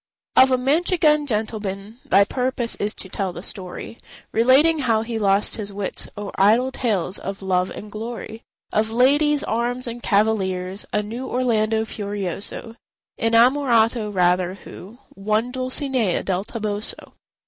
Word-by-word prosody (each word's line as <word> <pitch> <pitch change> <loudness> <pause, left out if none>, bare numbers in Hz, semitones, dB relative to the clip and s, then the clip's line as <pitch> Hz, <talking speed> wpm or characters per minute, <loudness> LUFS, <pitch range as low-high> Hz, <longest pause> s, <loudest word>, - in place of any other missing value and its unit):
Of 260 +1 +7
a 255 - +3
Manchegan 300 +2 +2
gentleman 215 -1 -3
Thy 200 - +5
purpose 250 +1 -1
is 210 +1 0
to - - -6
tell 190 0 -3
the 175 - -9
story, 190 +4 -6 0.3
Relating 270 +8 +4
how 225 -5 +1
he 225 -1 -4
lost 200 0 +2
his 205 -2 -5
wits 200 -1 -5
O'er 205 -1 -5
idle 225 +7 +4
tales 205 -8 -1
of 195 0 -6
love 185 -1 +1
and 210 - -9
glory, 225 +1 -7 0.3
Of 215 +1 +1
"ladies, 285 +5 +3
arms, 240 +3 -1
and 240 0 -6
cavaliers:" 195 -3 0
A 210 - 0
new 235 +5 -6
Orlando 225 -3 +1
Furioso— 205 +2 -5 0.4
Innamorato, 230 -1 +3
rather—who 185 +3 -1 0.2
Won 215 +4 -1
Dulcinea 255 -5 0
del 190 +1 -1
Toboso. 215 -2 -4
220 Hz, 135 wpm, -22 LUFS, 200-250 Hz, 0.4 s, Of